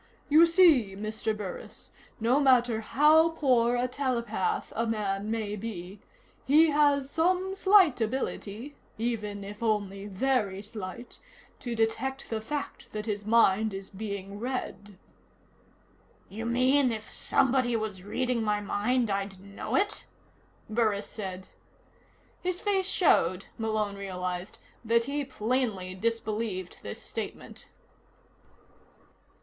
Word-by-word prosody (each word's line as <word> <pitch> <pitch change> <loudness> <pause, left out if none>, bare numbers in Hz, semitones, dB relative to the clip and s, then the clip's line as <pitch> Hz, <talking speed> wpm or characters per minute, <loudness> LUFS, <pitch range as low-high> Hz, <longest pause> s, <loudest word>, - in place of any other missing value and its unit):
You 320 +3 +7
see, 320 - +5
Mr. 215 +1 -3
Burris, 200 -3 -7 0.3
no 240 +5 +3
matter 245 -5 +4
how 305 +8 +5
poor 250 -7 +2
a 245 +1 +1
telepath 240 -6 -2
a 230 +1 0
man 205 -2 -2
may 220 -2 -2
be, 195 -2 -7 0.4
he 310 +3 +5
has 285 -2 +3
some 365 +5 +1
slight 380 - +5
ability 230 +1 -3 0.2
even 210 -3 -3
if 205 +2 -9
only 205 -3 -1
very 205 -2 0
slight 210 +2 -8 0.4
to 240 -2 -4
detect 250 +5 -1
the 220 -1 -1
fact 285 +5 -5
that 210 0 -4
his 210 -1 -3
mind 220 -2 +4
is 195 0 -8
being 200 -1 -6
read." 220 -5 -5 1.3
"You 225 +4 -5
mean, 255 +2 +3
if 220 -1 -6
somebody 255 -2 +2
was 215 -4 -3
reading 245 +4 -1
my 210 -1 +1
mind, 215 +3 0
I'd 195 -1 -3
know 200 +1 -5
it?" 410 +2 0 0.6
Burris 215 -2 +1
said. 190 -3 -6 0.9
His 360 0 -2
face 390 -2 +1
showed, 185 - +3
Malone 215 -2 -1
realized, 180 -1 -5 0.3
that 230 +1 +2
he 285 +1 -2
plainly 225 -7 -1
disbelieved 215 -2 -3
this 100 - -6
statement. - - -7
225 Hz, 120 wpm, -28 LUFS, 205-260 Hz, 1.3 s, You